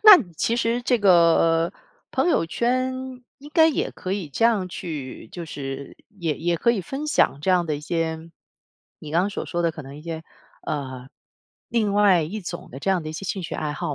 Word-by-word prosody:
那 415 -8 +11
其 230 +8 +1
实 235 0 +1
这 245 0 +2
个， 175 -5 +6
呃， 165 0 +2 0.4
朋 - - +1
友 165 - +2
圈 255 +6 0 0.4
应 290 +2 -12
该 320 -1 +6
也 300 - -1
可 185 - -5
以 190 -7 -3
这 225 - 0
样 210 -6 +3
去 145 -10 -6
就 175 - -6
是 140 -3 -6 0.2
也 160 -4 0
也 170 +1 0
可 235 - +3
以 230 -4 0
分 270 - -5
享 145 - +2
这 185 - +1
样 180 -2 +3
的 155 - 0
一 - - -8
些 165 +1 -2 0.7
你 150 - -9
刚 170 +3 +3
刚 200 - -1
所 - - -4
说 175 -1 -1
的， 170 - +2
可 155 - -8
能 135 +1 -10
一 150 - -11
些 165 -1 -5 0.4
呃， 130 -3 -4 0.6
另 220 -4 +1
外 200 -4 +5
一 200 +8 -4
种 175 -1 -7
的 130 - -8
这 195 +7 0
样 185 -3 +1
的 155 - -5
一 155 - -5
些 180 +5 -6
兴 190 +1 -3
趣 170 - -5
爱 150 -1 -2
好 150 - -3
170 Hz, 235 characters per minute, -24 LUFS, 155-210 Hz, 0.7 s, 那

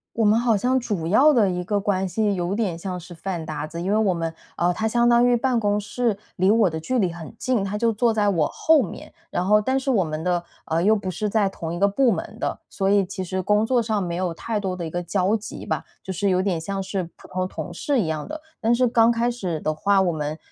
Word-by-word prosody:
我 230 - +1
们 215 +2 +4
好 235 -2 +2
像 255 +6 +2
主 195 -9 -3
要 280 - +5
的 210 -6 +4
一 180 0 -2
个 205 +2 0
关 195 -2 0
系 205 +1 0
有 175 +1 -2
点 200 -6 -1
像 180 +1 -5
是 175 0 -11
饭 175 -1 -4
搭 155 -1 -4
子， 165 +2 -6
因 185 - -2
为 210 - +3
我 205 -4 +2
们 165 -1 -2 0.3
呃， 175 +1 +2
他 220 +5 -1
相 240 +1 +3
当 240 0 +5
于 245 0 +4
办 245 0 +1
公 205 -1 +1
室 220 0 -1 0.2
离 190 +2 +3
我 220 -4 +4
的 160 -1 -4
距 255 +9 -1
离 185 -4 +1
很 170 +4 -9
近， 250 -6 0
他 205 +2 -3
就 230 -1 +2
坐 225 +1 +2
在 205 -2 +2
我 165 -6 +2
后 315 -5 +3
面。 175 - -8 0.2
然 175 - 0
后 210 +3 +4
但 260 +5 0
是 270 - -3
我 210 -8 +3
们 155 0 -4
的 175 -1 0 0.2
呃， 165 +2 0
又 215 +2 +5
不 195 -3 -3
是 210 +4 -2
在 205 -2 +2
同 165 -3 -6
一 175 - -4
个 200 - +4
部 240 +4 +3
门 - - -4
的， - - -2
所 195 -1 -2
以 200 -1 +4
其 190 -1 -5
实 185 +1 -2
工 210 +3 +2
作 245 0 +2
上 215 -3 -1
没 170 -1 -3
有 180 -1 -1
太 220 +2 -3
多 190 -2 -2
的 175 -2 -5
一 - - -4
个 175 +1 -2
交 185 +4 +1
集 215 - -7
吧， - - -2 0.2
就 190 - -4
是 200 +3 0
有 185 0 +2
点 175 -5 -1
像 195 +3 -3
是 190 -2 -3
普 - - -15
通 185 0 -2
同 180 -1 -6
事 275 +8 0
一 190 - +1
样 155 -1 -3
的。 310 +1 -6 0.2
但 230 +1 +3
是 250 +1 +3
刚 230 0 +4
开 235 +1 +1
始 180 -9 -3
的 155 +1 -1
话， 195 +5 +2
我 180 -2 +2
们 150 0 -3
200 Hz, 295 characters per minute, -23 LUFS, 175-225 Hz, 0.3 s, 要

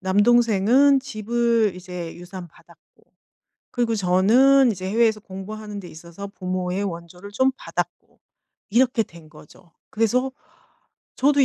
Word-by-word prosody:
남동생은 235 +6 +4
집을 235 -3 0
이제 180 -2 -7
유산 175 0 -9
받았고 - - -24 0.7
그리고 240 -2 0
저는 230 +8 +4
이제 185 -1 -5
해외에서 220 0 +2
공부하는 210 +2 -8
데 180 - -10
있어서 170 +5 -10
부모의 185 0 -3
원조를 180 +1 -7
좀 260 +5 +2
받았고 - - -6 0.5
이렇게 240 +1 +2
된 165 -4 -16
거죠. 160 +3 -18 0.2
그래서 245 +4 +1 0.9
저도 285 0 +4
205 Hz, 280 characters per minute, -23 LUFS, 185-240 Hz, 0.9 s, 남동생은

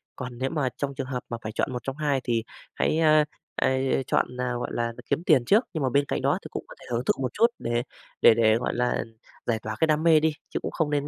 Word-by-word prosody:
Còn 125 -1 -7
nếu 130 +2 -1
mà 140 -5 0
trong 140 -1 -3
trường 130 -1 -4
hợp 125 -2 -4
mà 120 - -3
phải 110 - -5
chọn 110 - -1
một 125 - -4
trong 135 - -4
hai 145 -3 0
thì 115 -2 0 0.3
hãy, - - +1
a, 155 -1 +5 0.3
a, - - +1
a, 130 - +2 0.3
chọn 125 - +1
nào, 125 -1 -1
gọi 120 - -3
là, 120 - 0
là - - -4
đ 115 - -15
kiếm 165 - -1
tiền 150 -9 +4
trước, 210 - +5
nhưng 160 -4 -2
mà 130 - +2
bên 140 +3 +2
cạnh - - -2
đó - - +2
thì - - -9
cũng - - -4
có - - -12
thể - - -14
hưởng 120 +1 0
thụ - - +4
một 130 - -2
chút 230 - +5
để 120 +1 -1 0.4
để - - +8
để, 110 -1 +4
gọi 125 - -2
là, 125 0 0 0.4
giải 115 -2 0
tỏa 110 0 -5
cái 160 - +4
đam 155 0 +2
mê 160 -2 +6
đi, 160 +1 +2 0.2
chứ - - -2
cũng - - -4
không 160 -3 0
nên 145 -1 0
130 Hz, 295 wpm, -26 LUFS, 120-150 Hz, 0.4 s, để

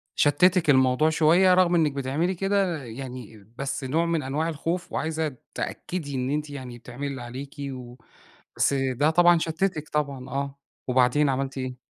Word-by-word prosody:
شتِّتِك 170 +2 +3
الموضوع 130 +3 +4
شوية، 170 +4 +5
رغم 180 -1 +4
إنِك 155 -3 +3
بتعملي 140 +7 -1
كده 195 -5 0
يعني 120 -4 -9
بس 140 0 -3
نوع 160 +6 +1
من 165 -3 0
أنواع 150 +5 -1
الخوف، 165 +3 -3
وعايزة 160 -3 -2 0.2
تأكدي 150 -6 -4
إن 130 +1 -1
أنتِ 150 +1 -2
يعني 130 -4 -7
بتعملي 125 +4 -6
اللي 135 -3 -5
عليكِ، 130 +5 -8 0.2
و 125 -1 -9 0.6
بس 140 - +2
ده 135 +3 +1
طبعًا 175 0 +5
شتِّتِك 160 -1 -2
طبعًا 140 -4 -2
آه، 140 +1 -3 0.3
وبعدين 130 +3 +3
عملتِ 135 0 -2
إيه؟ 130 -1 -5
145 Hz, 155 wpm, -25 LUFS, 130-165 Hz, 0.6 s, شوية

